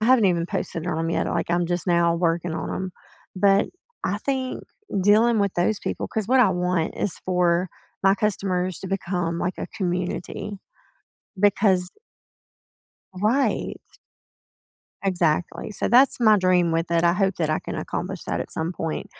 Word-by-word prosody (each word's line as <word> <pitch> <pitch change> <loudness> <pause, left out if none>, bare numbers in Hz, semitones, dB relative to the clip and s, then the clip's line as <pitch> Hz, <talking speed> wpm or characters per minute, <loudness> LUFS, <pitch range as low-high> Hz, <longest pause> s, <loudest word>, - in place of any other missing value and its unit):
I 215 - 0
haven't 255 -5 +5
even 170 -2 +1
posted 165 -1 -4
on 170 - -1
'em 165 0 -1
yet. - - 0
Like, - - -2
I'm 175 0 +1
just 175 -1 -2
now 170 -1 +3
working 170 0 0
on - - -4
'em, 185 -1 -4 0.4
but 195 +1 +4 0.4
I 205 +2 0
think 260 +1 -2 0.4
dealing 220 +4 +4
with 200 -2 +1
those 190 +4 +1
people - - -3
'cause 220 -1 -3
what 260 0 +5
I 220 -6 +5
want 180 -2 0
is 195 - -2
for 180 -1 +2 0.3
my 195 0 +5
customers 185 -3 -1
to 190 - -6
become 180 -3 -2
like 180 +2 -2
a - - -3
community 180 +2 -3 0.8
because 190 -2 +3 1.2
Right. 220 +9 0 1.2
Exactly, 175 0 0
so 210 - -2
that's 255 +4 +5
my 215 -3 +6
dream 180 -3 +3
with 165 +1 -1
it, 170 0 +2
I 170 - +5
hope 195 +1 +1
that 160 -3 0
I 155 - 0
can - - -6
accomplish - - -4
that - - -2
at - - -5
some 160 +3 -3
point, 165 -2 -4
185 Hz, 165 wpm, -24 LUFS, 170-205 Hz, 1.2 s, my